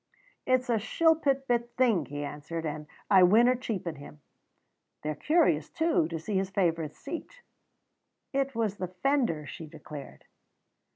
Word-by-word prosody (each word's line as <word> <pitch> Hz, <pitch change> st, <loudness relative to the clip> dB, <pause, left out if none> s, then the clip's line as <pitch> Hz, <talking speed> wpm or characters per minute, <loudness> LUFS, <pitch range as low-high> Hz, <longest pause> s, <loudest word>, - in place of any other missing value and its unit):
"It's 255 Hz, 0 st, +2 dB
a 235 Hz, -2 st, +2 dB
shilpit 280 Hz, +3 st, +2 dB
bit 240 Hz, 0 st, 0 dB
thing," 225 Hz, -, +3 dB
he 145 Hz, +2 st, -4 dB
answered, 150 Hz, +3 st, -5 dB
"and 150 Hz, 0 st, -4 dB, 0.2 s
I 190 Hz, -2 st, +8 dB
winna 230 Hz, +8 st, +6 dB
cheapen 195 Hz, -, -4 dB
him. 145 Hz, +1 st, -12 dB, 0.8 s
They're 155 Hz, 0 st, -1 dB
curious, 170 Hz, -, +2 dB
too, 325 Hz, -, +1 dB
to 165 Hz, 0 st, -4 dB
see 195 Hz, +6 st, -4 dB
his 190 Hz, 0 st, 0 dB
favourite 165 Hz, -6 st, 0 dB
seat." 340 Hz, -, -8 dB, 0.9 s
"It 275 Hz, -1 st, 0 dB
was 215 Hz, -3 st, -1 dB
the 185 Hz, -, -3 dB
fender," 185 Hz, -, 0 dB
she 160 Hz, +3 st, -8 dB
declared. 145 Hz, -, -10 dB
190 Hz, 140 wpm, -29 LUFS, 155-255 Hz, 0.9 s, I